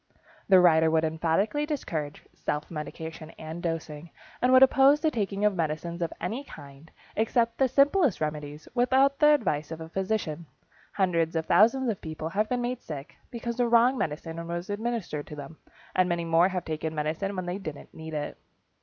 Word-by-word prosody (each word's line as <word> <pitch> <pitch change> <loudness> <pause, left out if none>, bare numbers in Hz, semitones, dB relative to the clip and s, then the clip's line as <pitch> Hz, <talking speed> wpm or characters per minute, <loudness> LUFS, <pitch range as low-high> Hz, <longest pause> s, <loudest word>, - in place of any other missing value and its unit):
The 190 -1 +8
writer 160 -2 +5
would 160 0 +2
emphatically 165 - 0
discourage 160 - -4
self 150 +3 -4
medication 160 0 -7
and 160 +2 -7
dosing, 165 -1 -4 0.3
and 250 - +3
would 260 0 +8
oppose 270 +2 +6
the 315 0 +1
taking 205 -3 -1
of 210 - +3
medicines 170 +1 -3
of 170 - -1
any 225 +10 -3
kind, 140 - -13 0.3
except 230 +1 +1
the 265 - +4
simplest 280 - +3
remedies, 150 0 -4
without 265 +3 +3
the 300 - +6
advice 155 - -1
of 160 0 -6
a 160 0 -8
physician. 185 -4 -2 0.5
Hundreds 170 -4 +1
of 160 0 0
thousands 255 +5 +4
of 220 -5 -2
people 155 0 -5
have 210 +4 0
been 250 -1 0
made 245 +1 -3
sick, 145 -2 -8
because 235 0 -5
the 245 -1 +2
wrong 240 +3 +5
medicine 165 - -4
was 175 +3 -4
administered 210 -8 -3
to 150 - -8
them, 145 +2 -9 0.4
and 185 0 +3
many 170 -1 -1
more 165 +2 +4
have 180 -2 -3
taken 160 0 -3
medicine 160 +7 -2
when 185 -1 -3
they 180 +2 -3
didn't 155 -7 -8
need 160 0 -8
it. 150 - -4
175 Hz, 180 wpm, -27 LUFS, 160-235 Hz, 0.5 s, The